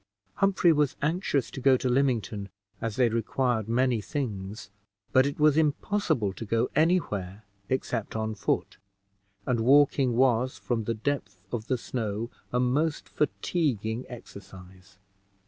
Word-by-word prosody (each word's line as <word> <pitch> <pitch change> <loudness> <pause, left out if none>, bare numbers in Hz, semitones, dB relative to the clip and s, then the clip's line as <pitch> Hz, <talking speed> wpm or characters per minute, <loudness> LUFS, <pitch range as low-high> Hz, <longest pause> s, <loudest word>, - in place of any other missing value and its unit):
Humphrey 195 -3 +4
was 150 -3 +1
anxious 155 -3 0
to 130 - -7
go 130 0 +5
to 130 - -2
Lymington, 120 -6 0 0.3
as 115 -2 -2
they 125 -2 +4
required 115 0 0
many 120 -1 +2
things 105 -5 -5 0.4
but 130 +1 +5
it 140 - -5
was 150 0 +5
impossible 150 - +1
to 115 - -7
go 115 +2 0
any 165 +4 +5
where 100 - -5 0.3
except 125 -4 -2
on 110 0 -1
foot, 100 - -2 0.7
and 125 -3 +1
walking 135 +1 +4
was, 130 0 +2
from 115 -3 -2
the 115 - -1
depth 105 -6 -3
of 115 -2 -4
the 130 - +1
snow, 115 -2 -3 0.2
a 125 - +1
most 145 +5 0
fatiguing 130 - -1
exercise. 95 -4 -12
120 Hz, 140 wpm, -27 LUFS, 110-140 Hz, 0.7 s, go